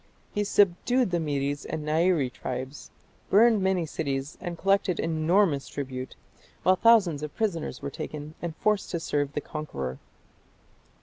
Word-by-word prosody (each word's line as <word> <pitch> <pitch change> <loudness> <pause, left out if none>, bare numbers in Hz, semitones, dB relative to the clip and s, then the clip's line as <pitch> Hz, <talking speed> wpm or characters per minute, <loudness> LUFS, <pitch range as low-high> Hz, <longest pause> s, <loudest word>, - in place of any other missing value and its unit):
He 205 - +1
subdued 205 +4 +2
the 175 - +1
Medes 145 -2 -1
and 155 -1 -4
the - - 0
Nairi 160 -5 +2
tribes, 130 +3 -6 0.4
burned 220 +1 +5
many 190 -3 +1
cities 140 -2 -3
and 175 -2 -5
collected 195 -1 +2
enormous 165 -1 +2
tribute, 130 -2 -5 0.5
while 185 - +5
thousands 195 -9 +4
of 150 -1 -6
prisoners 195 -8 -2
were 140 - -3
taken 150 +2 -6
and 170 -2 -4
forced 210 +1 +1
to 170 - -2
serve 145 -3 -1
the 150 - -2
conqueror. 70 - -5
160 Hz, 145 wpm, -27 LUFS, 145-190 Hz, 0.5 s, burned